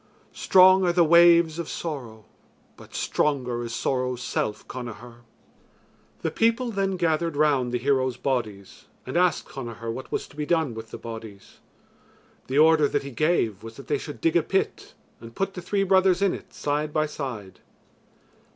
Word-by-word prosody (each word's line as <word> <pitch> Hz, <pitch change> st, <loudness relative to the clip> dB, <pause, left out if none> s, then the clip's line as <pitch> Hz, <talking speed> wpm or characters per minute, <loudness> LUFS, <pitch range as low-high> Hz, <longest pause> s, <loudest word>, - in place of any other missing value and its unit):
Strong 185 Hz, 0 st, +5 dB
are 175 Hz, -, +3 dB
the 175 Hz, 0 st, +4 dB
waves 170 Hz, 0 st, +5 dB
of 170 Hz, -, -4 dB
sorrow, 120 Hz, -10 st, -6 dB, 0.5 s
but -, -, -15 dB
stronger 125 Hz, -5 st, -1 dB
is 115 Hz, -, -6 dB
sorrow's 125 Hz, +1 st, -2 dB
self, 105 Hz, -, -3 dB
Connachar." 120 Hz, -1 st, -8 dB, 1.1 s
The -, -, -1 dB
people 230 Hz, +2 st, +1 dB
then 195 Hz, -2 st, -1 dB
gathered 165 Hz, -2 st, 0 dB
round 140 Hz, -5 st, +2 dB
the 125 Hz, -, 0 dB
heroes' 130 Hz, -1 st, 0 dB
bodies 110 Hz, -8 st, -4 dB, 0.2 s
and -, -, -6 dB
asked 180 Hz, 0 st, +2 dB
Connachar 115 Hz, -3 st, -6 dB
what 130 Hz, +2 st, -8 dB
was -, -, -3 dB
to -, -, -18 dB
be 150 Hz, -, -3 dB
done 160 Hz, -7 st, +1 dB
with 110 Hz, 0 st, -9 dB
the -, -, -8 dB
bodies. 110 Hz, -3 st, -10 dB, 0.9 s
The 130 Hz, -, -2 dB
order 155 Hz, -1 st, +5 dB
that -, -, -1 dB
he 140 Hz, -, -7 dB
gave 120 Hz, -, 0 dB
was 115 Hz, 0 st, -10 dB
that 135 Hz, -, -10 dB
they 145 Hz, -2 st, -1 dB
should 145 Hz, -, -9 dB
dig 165 Hz, 0 st, +1 dB
a 170 Hz, -, +5 dB
pit 190 Hz, +4 st, -2 dB, 0.2 s
and 115 Hz, 0 st, -12 dB
put 195 Hz, 0 st, -2 dB
the 180 Hz, -, -7 dB
three 195 Hz, +3 st, 0 dB
brothers 190 Hz, -1 st, +3 dB
in 195 Hz, -, +2 dB
it -, -, -9 dB
side 150 Hz, +1 st, -2 dB
by 155 Hz, 0 st, +1 dB
side. 120 Hz, -, -7 dB
145 Hz, 170 wpm, -25 LUFS, 120-170 Hz, 1.1 s, Strong